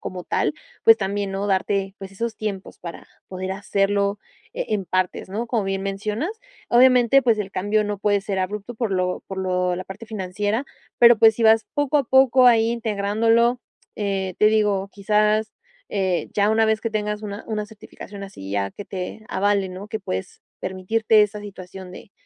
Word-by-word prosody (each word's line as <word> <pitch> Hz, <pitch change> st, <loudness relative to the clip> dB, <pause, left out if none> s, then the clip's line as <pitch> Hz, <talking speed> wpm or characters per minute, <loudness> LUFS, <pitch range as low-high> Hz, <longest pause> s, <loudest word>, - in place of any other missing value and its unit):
como 180 Hz, -2 st, -6 dB
tal, 150 Hz, -, 0 dB, 0.3 s
pues 225 Hz, 0 st, +8 dB
también 200 Hz, 0 st, -2 dB
¿no? 195 Hz, +1 st, -2 dB
Darte, 195 Hz, 0 st, 0 dB
pues 195 Hz, 0 st, -9 dB
esos 230 Hz, +3 st, -3 dB
tiempos 200 Hz, -3 st, -5 dB
para 170 Hz, -1 st, -9 dB, 0.2 s
poder 185 Hz, 0 st, -4 dB
hacerlo, 200 Hz, +1 st, 0 dB, 0.4 s
eh, -, -, -3 dB
en 205 Hz, -3 st, 0 dB
partes 185 Hz, 0 st, -1 dB
¿no? 225 Hz, +4 st, -3 dB
Como 230 Hz, -4 st, -1 dB
bien 195 Hz, 0 st, -2 dB
mencionas. 210 Hz, -, -2 dB, 0.4 s
Obviamente 250 Hz, +1 st, +6 dB
pues, 230 Hz, -3 st, +3 dB
el 200 Hz, -2 st, -3 dB
cambio 205 Hz, +3 st, +1 dB
no 205 Hz, -1 st, -3 dB
puede 205 Hz, 0 st, +1 dB
ser 200 Hz, -3 st, -3 dB
abrupto 210 Hz, +5 st, -4 dB
por 225 Hz, -2 st, -2 dB
lo 180 Hz, -1 st, -1 dB
por 195 Hz, -, -7 dB
lo 180 Hz, -1 st, 0 dB
la 185 Hz, -, -5 dB
parte 205 Hz, +4 st, -10 dB
financiera 210 Hz, +3 st, -2 dB, 0.3 s
pero 235 Hz, -2 st, +7 dB
pues 220 Hz, -1 st, +6 dB
si 230 Hz, -, -3 dB
vas 220 Hz, 0 st, +5 dB
poco 290 Hz, 0 st, +1 dB
a 275 Hz, -, 0 dB
poco 260 Hz, 0 st, +5 dB
ahí 230 Hz, -1 st, +5 dB
integrándolo, 230 Hz, +2 st, +1 dB, 0.4 s
eh, 195 Hz, -3 st, -2 dB
te 210 Hz, -, +5 dB
digo, 210 Hz, -3 st, +2 dB
quizás, 210 Hz, +1 st, +1 dB, 0.4 s
eh, 190 Hz, -3 st, -1 dB
ya 205 Hz, 0 st, +3 dB
una 220 Hz, 0 st, +3 dB
vez 220 Hz, 0 st, +1 dB
que 230 Hz, -, -2 dB
tengas 210 Hz, -1 st, -2 dB
una 205 Hz, 0 st, -6 dB
una 210 Hz, -1 st, -2 dB
certificación 205 Hz, -1 st, -11 dB
así 100 Hz, -, -9 dB
ya 100 Hz, -1 st, -1 dB
que 205 Hz, -, -9 dB
te 190 Hz, +3 st, -6 dB
avale, 200 Hz, -1 st, +1 dB
¿no? 190 Hz, +3 st, -8 dB
Que 220 Hz, 0 st, -4 dB
pues, 95 Hz, -, -5 dB, 0.2 s
permitirte 215 Hz, +4 st, +2 dB
esa 210 Hz, 0 st, -2 dB
situación 190 Hz, -2 st, -10 dB
de 195 Hz, -, -12 dB
205 Hz, 185 wpm, -23 LUFS, 190-220 Hz, 0.4 s, pues